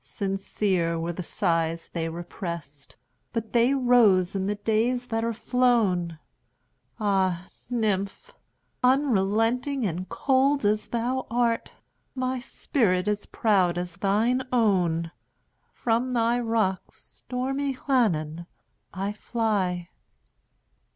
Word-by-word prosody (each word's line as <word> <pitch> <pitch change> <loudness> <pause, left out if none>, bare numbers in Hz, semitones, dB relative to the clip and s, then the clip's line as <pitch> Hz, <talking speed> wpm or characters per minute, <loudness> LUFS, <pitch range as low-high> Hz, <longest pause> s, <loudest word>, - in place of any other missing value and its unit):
Sincere 195 -3 -1
were 165 +1 -2
the 180 - -5
sighs 165 -3 -1
they 165 -1 -3
represt, 170 -4 -7 0.4
But 225 -2 -4
they 240 +3 +4
rose 225 -8 +4
in 195 -1 -1
the 205 - 0
days 225 +4 0
that 225 -2 -2
are 230 - 0
flown! 220 -8 +1 0.8
Ah, 190 -4 +1 0.2
nymph! 215 - -1 0.5
unrelenting 250 0 +2
and 180 0 -3
cold 275 -1 +2
as 210 +1 +1
thou 245 +2 -2
art, 235 0 0 0.4
My 255 0 -1
spirit 210 -7 0
is 210 0 -1
proud 185 -6 +2
as 175 -1 -4
thine 220 +6 +2
own! 180 -8 +2 0.6
From 240 +2 0
thy 235 0 +2
rocks, 225 -5 -1
stormy 270 +2 -4
Llannon, 170 - 0 0.4
I 195 +2 -3
fly. 200 -6 -1
210 Hz, 105 wpm, -26 LUFS, 180-245 Hz, 0.8 s, they